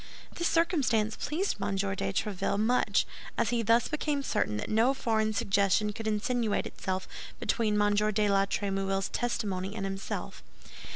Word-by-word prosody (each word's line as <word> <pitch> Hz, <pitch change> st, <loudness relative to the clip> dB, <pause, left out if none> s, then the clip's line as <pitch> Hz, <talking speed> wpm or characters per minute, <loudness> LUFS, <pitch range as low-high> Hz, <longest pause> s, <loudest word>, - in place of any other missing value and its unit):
This 345 Hz, -, 0 dB
circumstance 260 Hz, -, +2 dB
pleased 355 Hz, +7 st, -2 dB
M. 200 Hz, 0 st, -1 dB
de 195 Hz, +1 st, 0 dB
Tréville 195 Hz, 0 st, -1 dB
much, 240 Hz, +4 st, +2 dB, 0.3 s
as 220 Hz, -, +1 dB
he 240 Hz, -1 st, +1 dB
thus 230 Hz, +1 st, +3 dB
became 295 Hz, -2 st, -1 dB
certain 105 Hz, -, 0 dB
that 105 Hz, -, -4 dB
no 230 Hz, +5 st, +3 dB
foreign 220 Hz, -4 st, +1 dB
suggestion 200 Hz, 0 st, +2 dB
could 225 Hz, +1 st, -5 dB
insinuate 220 Hz, +1 st, 0 dB
itself 190 Hz, -1 st, -4 dB, 0.3 s
between 215 Hz, -3 st, +1 dB
M. 205 Hz, 0 st, +3 dB
de 210 Hz, 0 st, +2 dB
la 195 Hz, 0 st, +3 dB
Trémouille's 195 Hz, -1 st, -1 dB
testimony 200 Hz, -5 st, -2 dB
and 195 Hz, -3 st, -3 dB
himself. 195 Hz, +1 st, -5 dB
210 Hz, 150 wpm, -29 LUFS, 195-235 Hz, 0.3 s, thus